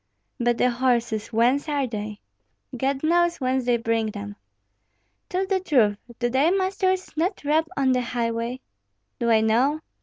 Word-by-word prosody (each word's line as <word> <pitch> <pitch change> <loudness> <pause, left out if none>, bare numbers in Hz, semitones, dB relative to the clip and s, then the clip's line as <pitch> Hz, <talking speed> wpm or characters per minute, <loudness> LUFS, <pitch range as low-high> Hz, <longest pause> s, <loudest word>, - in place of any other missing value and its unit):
"But 240 -1 +1
the 250 - +3
horses, 235 -3 0
whence 245 +7 +1
are 285 -2 0
they?" 210 -3 -6 0.5
"God 270 +3 -1
knows 345 +2 +2
whence 260 -1 0
they 245 -1 +3
bring 230 -1 0
them." 100 - -6 0.9
"Tell 370 +1 0
the 385 0 0
truth; 235 - +2 0.2
do 240 - 0
thy 265 +6 +3
masters 375 -1 0
not 350 +4 -1
rob 315 +2 +2
on 270 -2 +3
the 250 -1 +2
highway?" 235 +1 -2 0.6
"Do 235 -1 0
I 220 -1 +5
know? 250 +8 +2
255 Hz, 155 wpm, -24 LUFS, 230-310 Hz, 0.9 s, I